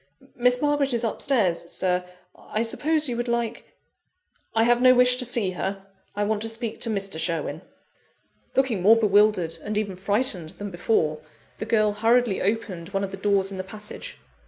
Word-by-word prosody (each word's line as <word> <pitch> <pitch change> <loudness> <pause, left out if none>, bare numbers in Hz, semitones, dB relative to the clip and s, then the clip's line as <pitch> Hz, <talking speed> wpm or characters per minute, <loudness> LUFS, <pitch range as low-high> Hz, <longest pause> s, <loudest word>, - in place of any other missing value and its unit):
"Miss 250 0 +2
Margaret 290 -3 +1
is 235 - -1
upstairs, 210 -8 0
Sir. 180 -1 0 0.3
I 215 - -3
suppose 300 +6 0
you 245 - -2
would 240 +1 -2
like 235 -1 -2 0.5
" 370 -8 -39
"I 225 - +4
have 240 +1 +3
no 255 0 +7
wish 250 0 +5
to 250 - +1
see 230 -6 +1
her: 195 +2 -4 0.3
I 205 - 0
want 210 0 -1
to 225 - -3
speak 225 0 -4
to 230 - 0
Mr. 195 -6 -2
Sherwin." 160 -3 -2 0.9
Looking 260 -8 +1
more 215 +5 +7
bewildered, 205 -5 +2
and 210 0 -3
even 200 -3 -2
frightened, 195 - 0
than 205 -1 -6
before, 165 -4 0 0.4
the - - -3
girl 215 -2 +2
hurriedly 225 0 +2
opened 195 -4 -2
one 195 0 -2
of 195 - -4
the - - -5
doors 195 0 +1
in 190 - -6
the - - -2
passage. 215 - -7
215 Hz, 180 wpm, -24 LUFS, 195-240 Hz, 0.9 s, no